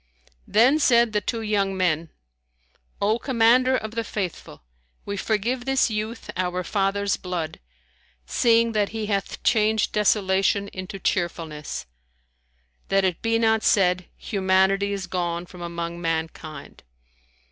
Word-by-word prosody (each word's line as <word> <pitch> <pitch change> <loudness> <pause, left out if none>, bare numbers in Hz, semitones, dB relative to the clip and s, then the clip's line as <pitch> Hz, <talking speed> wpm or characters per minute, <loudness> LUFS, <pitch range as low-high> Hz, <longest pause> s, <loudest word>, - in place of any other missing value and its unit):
Then 250 +8 +4
said 235 -5 +4
the 210 - +1
two 225 +3 -3
young 200 -3 0
men, 165 -3 0 0.9
"O 215 +3 +1
Commander 255 +1 +3
of 220 -2 -5
the 230 0 -2
Faithful, 190 - -5 0.4
we 200 - -3
forgive 230 +5 -1
this 270 -3 +2
youth 215 +2 -4
our 180 0 -1
father's 200 +1 0
blood, 175 -4 -4 0.7
seeing 230 - +3
that 210 -2 +1
he 220 -1 -4
hath 200 -2 -3
changed 220 -1 +2
desolation 200 -1 +2
into 185 +1 -7
cheerfulness; 165 - -3 1.0
that 195 0 +2
it 180 -3 -1
be 225 0 +1
not 220 -1 +2
said, 180 -4 +2
Humanity 195 0 +1
is 195 -1 -3
gone 175 -1 -2
from 180 0 -13
among 170 0 -5
mankind." 160 -3 -4
200 Hz, 125 wpm, -24 LUFS, 180-220 Hz, 1.0 s, Then